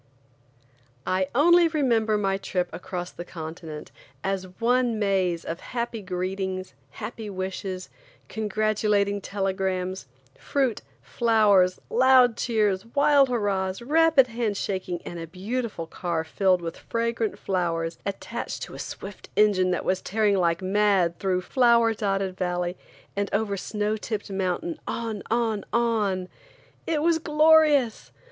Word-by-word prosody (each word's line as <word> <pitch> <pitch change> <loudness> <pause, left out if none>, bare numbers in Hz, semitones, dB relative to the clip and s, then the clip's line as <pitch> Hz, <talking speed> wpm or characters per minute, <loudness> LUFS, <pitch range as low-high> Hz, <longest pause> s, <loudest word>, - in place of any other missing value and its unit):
I 185 0 +1
ONLY 345 +5 +6
remember 235 -9 +1
my 195 -2 0
trip 180 -2 -2
across 180 0 -5
the 175 - -8
continent 160 -2 -8 0.3
as 190 -1 -2
one 240 0 +2
maze 190 -5 0
of 165 - -4
happy 235 -2 -4
greetings, 185 -1 -3 0.2
happy 220 -2 -6
wishes, 185 -1 -4 0.4
congratulating 210 -1 0
telegrams, 190 -3 -2 0.3
fruit, 265 -5 0 0.2
flowers, 205 -6 +3
loud 255 -1 +5
cheers, 210 -6 +1
wild 280 +2 +4
hurrahs, 200 -3 -1
rapid 315 0 +5
hand 230 -4 -2
shaking 185 -4 -3
and 175 - -6
a 165 - -6
beautiful 205 +1 -4
car 165 0 -3
filled 185 +2 +1
with 165 -1 -5
fragrant 230 -1 -2
flowers 170 -3 -2
attached 200 -1 -5
to - - -8
a - - -9
swift - - -8
engine 200 -3 +4
that 180 - -1
was 185 0 0
tearing 210 0 +1
like 170 0 +1
mad 190 -3 +2
through 185 -2 0
flower 235 +2 +4
dotted 195 -3 -1
valley 180 -1 -2 0.4
and 200 0 -1
over 205 -1 0
snow 210 +2 -2
tipped 215 -1 -5
mountain, 195 - -2
on–on–on! 220 -3 -1 0.6
It 305 -2 0
was 330 -1 +3
glorious! 305 -5 +4
200 Hz, 125 wpm, -25 LUFS, 185-230 Hz, 0.6 s, ONLY